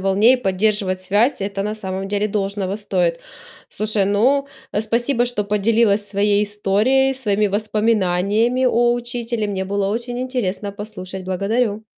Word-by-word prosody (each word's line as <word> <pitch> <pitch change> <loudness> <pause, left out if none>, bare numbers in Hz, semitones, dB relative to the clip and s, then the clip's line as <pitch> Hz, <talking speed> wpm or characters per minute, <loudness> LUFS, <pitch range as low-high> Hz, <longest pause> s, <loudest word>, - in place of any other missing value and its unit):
волне 195 +5 +4
и - - +3
поддерживать 195 -2 0
связь- 210 +8 +1
это 195 0 -3
на 210 +1 -2
самом 195 -2 -5
деле 205 +1 0
должного 200 -1 -2
стоит. 180 -5 -1 0.5
Слушай, 215 -1 -1
ну, 255 +8 +2 0.3
спасибо, 240 +3 0
что 240 -4 -2
поделилась 210 0 +2
своей 205 0 +2
историей, 210 +6 +2
своими 210 -5 0
воспоминаниями 215 +2 +1
о 240 -1 +3
учителе. 240 -2 -3
Мне 190 -2 -3
было 200 0 -1
очень 240 +3 -3
интересно 220 -6 -2
послушать. 190 -2 -7
Благодарю. 205 +4 -1
210 Hz, 135 wpm, -20 LUFS, 195-235 Hz, 0.5 s, волне